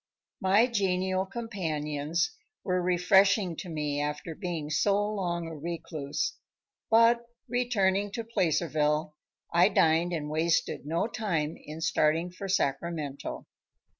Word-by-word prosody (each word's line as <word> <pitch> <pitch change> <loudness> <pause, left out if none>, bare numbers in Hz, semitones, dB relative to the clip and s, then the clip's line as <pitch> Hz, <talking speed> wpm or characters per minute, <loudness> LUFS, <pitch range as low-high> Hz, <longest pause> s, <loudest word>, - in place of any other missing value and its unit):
My 200 +4 +5
genial 190 -4 0
companions 160 -8 -2 0.3
were 180 -1 0
refreshing 185 +1 +3
to 180 - -6
me 150 -2 -2
after 150 +2 -3
being 160 -3 -4
so 175 +7 +3
long 175 -5 -2
a 165 -1 -6
recluse, 160 - -4 0.5
but, 230 +1 +5 0.2
returning 205 -5 +1
to 230 - -3
Placerville, 155 -7 0 0.4
I 175 +3 +6
dined 165 -2 +3
and 155 -4 -2
wasted 160 -1 0
no 165 +5 0
time 170 -9 -2
in 155 +2 -9
starting 165 +2 +2
for 195 +2 -7
Sacramento. 150 -4 -2
175 Hz, 115 wpm, -29 LUFS, 155-195 Hz, 0.5 s, I